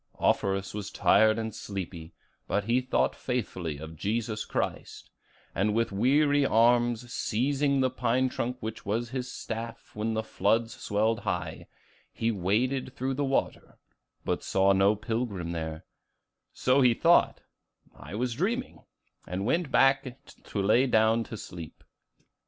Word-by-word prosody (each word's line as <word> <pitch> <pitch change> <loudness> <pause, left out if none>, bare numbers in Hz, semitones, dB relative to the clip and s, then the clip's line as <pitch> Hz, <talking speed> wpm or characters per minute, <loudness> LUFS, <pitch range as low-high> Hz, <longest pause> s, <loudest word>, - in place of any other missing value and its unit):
Offerus 95 0 0
was 105 -1 -5
tired 110 +1 +4
and 110 -1 -3
sleepy; 90 -5 -6 0.4
but 105 - 0
he 120 +4 +2
thought 130 - 0
faithfully 90 - -3
of 80 +2 -9
Jesus 110 +4 -2
Christ, - - -4 0.4
and 105 +3 +1
with 115 -1 +1
weary 145 +7 +3
arms 120 0 +2
seizing 140 +4 +1
the 130 -1 +2
pine 125 +1 +1
trunk 125 0 -3
which 110 0 -5
was 115 +3 -2
his 130 -1 -4
staff 115 0 -6
when 110 +1 -1
the 110 - -1
floods 115 +1 0
swelled 110 +2 0
high, - - -4 0.4
he 115 +1 -1
waded 125 +7 0
through 130 +1 -2
the 145 +2 -1
water, 135 -1 -2 0.5
but - - -1
saw 95 0 +3
no 100 +2 +4
pilgrim 105 -5 -3
there; 80 -1 -5 0.7
so 130 +2 +2
he 125 -3 +5
thought, 170 +6 +4 0.5
'I 80 +6 -9
was 120 +2 -1
dreaming,' 225 - -2 0.5
and 90 +3 -3
went 165 +5 +1
back 135 +1 +4
and 125 - -7 0.4
lay 110 +6 +3
down 110 -1 +3
to 110 - -7
sleep. 85 -5 -9
115 Hz, 140 wpm, -28 LUFS, 100-125 Hz, 0.7 s, he